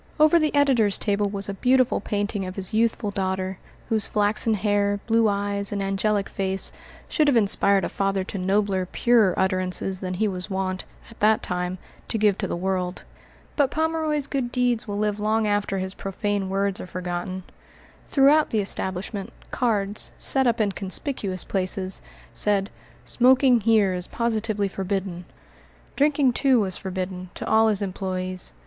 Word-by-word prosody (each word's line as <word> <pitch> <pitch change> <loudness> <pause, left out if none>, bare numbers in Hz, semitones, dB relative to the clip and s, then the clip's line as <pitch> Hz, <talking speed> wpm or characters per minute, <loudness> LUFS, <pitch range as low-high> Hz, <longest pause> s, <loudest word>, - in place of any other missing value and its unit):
Over 310 +2 +6
the 305 -2 0
editor's 255 -8 +3
table 205 -1 0
was 200 0 -4
a 200 - -3
beautiful 255 +4 +2
painting 205 0 -2
of 185 - -7
his 195 +2 -2
youthful 220 -2 +1
daughter, 190 -1 -2 0.3
whose 220 -2 +5
flaxen 215 +1 +1
hair, 205 0 +1
blue 225 -1 +3
eyes, 200 0 -1
and 205 - -2
angelic 195 +1 0
face 190 0 -1 0.4
should 305 -2 +1
have 275 -4 +4
inspired 200 -3 +4
a - - -1
father 195 -1 -1
to 195 +1 -6
nobler, 190 0 0
purer, 230 -7 +3
utterances 185 0 0
than 185 -1 -4
he 215 +4 +1
was 185 0 -4
wont, 190 -1 -3 0.3
at 230 - -16
that 215 +1 +3
time, 180 0 -3 0.3
to - - -1
give 210 -2 +3
to 195 - -1
the - - -3
world. 185 0 -2 0.5
But 285 -3 +2
Pomeroy's 315 -2 -1
good 265 -4 -3
deeds 245 -2 0
will 205 -1 -3
live 210 0 -1
long 215 +1 +1
after 205 -1 0
his 190 0 -4
profane 200 0 -3
words 195 0 -1
are - - -8
forgotten. 185 +1 -4 0.6
Throughout 290 +2 +4
the 220 - -1
establishment 195 0 -3 0.2
cards, 210 -4 -1
set 265 -2 +2
up 235 -1 +1
in 210 -2 +2
conspicuous 195 - -1
places, 185 0 -1 0.3
said, 200 -1 0 0.3
"Smoking 255 0 +4
here 210 -3 +3
is 180 -1 -4
positively 220 -3 -1
forbidden." 190 -2 -4 0.7
Drinking, 280 -3 +3
too, 265 -1 +3
was 190 -4 0
forbidden 185 -1 -5
to - - -6
all 220 0 +4
his 210 -2 +1
employés. 185 -1 -4
200 Hz, 160 wpm, -24 LUFS, 190-225 Hz, 0.7 s, Over